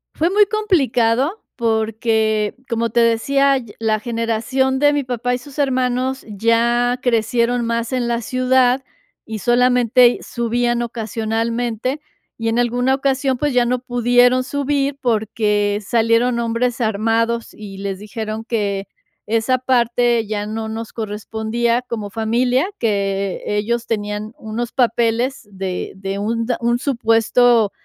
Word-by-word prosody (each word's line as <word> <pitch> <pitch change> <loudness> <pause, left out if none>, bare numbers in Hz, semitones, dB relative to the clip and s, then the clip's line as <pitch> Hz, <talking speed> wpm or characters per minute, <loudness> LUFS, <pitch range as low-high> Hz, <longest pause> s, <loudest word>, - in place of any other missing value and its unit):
Fue 330 +3 +1
muy 410 +2 +5
complicado 290 - +1
porque, 220 -1 0
como 230 -1 0
te 235 - +1
decía, 275 +4 +3 0.2
la 220 -1 +1
generación 235 +3 -1
de 290 +1 +4
mi 290 -1 0
papá 245 -1 -2
y - - 0
sus 275 +3 -11
hermanos 260 -1 0
ya 235 +3 +1
crecieron 235 0 +1
más 230 +2 -2
en 250 -2 0
la 235 0 -1
ciudad, 255 +1 +2 0.5
y 220 -1 -4
solamente 245 0 +4
subían 240 0 -1
ocasionalmente, 230 +2 -2 0.4
y 225 - -3
en 230 +1 +1
alguna 245 +2 +1
ocasión, 270 -1 0
pues, 290 +1 -1
ya 245 -1 +3
no 250 +1 0
pudieron 245 0 +3
subir 280 +1 -1
porque 210 -3 0
salieron 230 +2 +2
hombres 235 +1 -1
armados, 225 +1 0
y 200 -2 -10
les 195 -1 -4
dijeron 215 +1 -5
que 200 -4 -2 0.4
esa 230 +4 +1
parte 240 -2 +1
ya 205 -1 -2
no 220 +1 -4
nos 225 0 -6
correspondía 220 +2 -2
como 220 -4 -5
familia, 245 - +1
que 200 -3 -1
ellos 225 +3 -1
tenían 210 0 -3
unos 225 +2 -4
papeles 240 0 0
de 190 -2 -4
de, 195 0 -4
un 230 +2 -1
un 240 +1 +1
supuesto 235 -3 +3
235 Hz, 130 wpm, -19 LUFS, 220-250 Hz, 0.5 s, muy